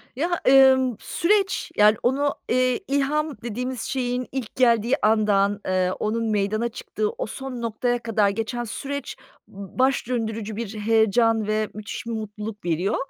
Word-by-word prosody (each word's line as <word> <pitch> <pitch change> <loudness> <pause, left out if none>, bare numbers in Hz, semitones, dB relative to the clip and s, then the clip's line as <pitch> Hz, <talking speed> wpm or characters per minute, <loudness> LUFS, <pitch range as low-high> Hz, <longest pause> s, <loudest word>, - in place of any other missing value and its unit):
Ya, 340 +6 -1
emm, 260 -2 +6
süreç, 390 +3 0
yani, 210 0 +6
onu, 280 +3 +1
eee, 255 0 +2
ilham 285 +2 0
dediğimiz 250 +1 -4
şeyin 250 -1 -2
ilk 255 -5 -5
geldiği 235 -1 +3
andan, 205 -2 +2
eee, 185 -1 +1
onun 225 +2 -1
meydana 215 +3 0
çıktığı, 425 - -3
o - - -2
son 265 -3 -6
noktaya 240 +2 -1
kadar 215 -3 +2
geçen 225 +4 -3
süreç 280 +5 -5 0.3
b 200 +4 -11
baş 260 -2 +2
döndürücü 220 -3 -3
bir 220 -1 -5
heyecan 220 0 +2
ve 215 0 0
müthiş 215 +2 -7
bir 235 - -4
mutluluk 215 -2 -6
veriyor. 175 +3 0
230 Hz, 145 wpm, -24 LUFS, 215-260 Hz, 0.3 s, emm